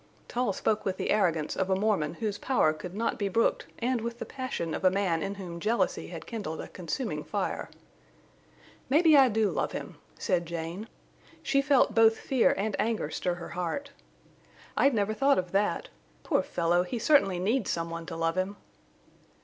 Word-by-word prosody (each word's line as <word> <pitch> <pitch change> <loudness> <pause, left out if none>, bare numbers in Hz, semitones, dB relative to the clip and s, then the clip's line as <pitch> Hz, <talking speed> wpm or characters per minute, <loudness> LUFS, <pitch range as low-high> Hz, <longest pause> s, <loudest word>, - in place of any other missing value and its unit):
Tull 245 -3 0
spoke 215 +2 0
with 190 -1 -2
the - - -1
arrogance 165 -7 +1
of 190 0 -1
a 190 - +3
Mormon 190 -6 0
whose 205 +1 -3
power 245 -12 +2
could 175 +4 -8
not 230 +2 -1
be 200 -1 0
brooked - - +1
and 245 0 0
with 235 +1 -4
the - - -5
passion 255 -11 -4
of - - -4
a 185 - +7
man 185 -4 0
in 195 +4 -3
whom 175 -4 -7
jealousy 220 +6 0
had - - -8
kindled 205 -9 -5
a - - -6
consuming 185 +9 -4
fire. - - -3 1.2
"Maybe 310 +3 +6
I 270 -2 +7
do 220 -1 +1
love - - -1
him," - - -6 0.2
said 175 -5 0
Jane. 170 +5 -5 0.6
She 275 - +2
felt 275 -5 +3
both 225 0 +5
fear 260 -3 +2
and 205 +1 -1
anger 220 -9 0
stir 180 +2 -1
her 175 -1 -8
heart. 180 - -3 0.8
"I'd 275 -3 +4
never 210 0 +1
thought 275 +5 +3
of 180 -1 -2
that. 200 -3 0 0.3
Poor - - +2
fellow! 170 +1 +1
he 180 +7 -3
certainly 225 -7 +4
needs 210 +5 0
some 165 0 -2
one 165 0 -6
to 165 - -5
love 165 +2 0
him." 190 +2 -2
200 Hz, 185 wpm, -29 LUFS, 175-235 Hz, 1.2 s, a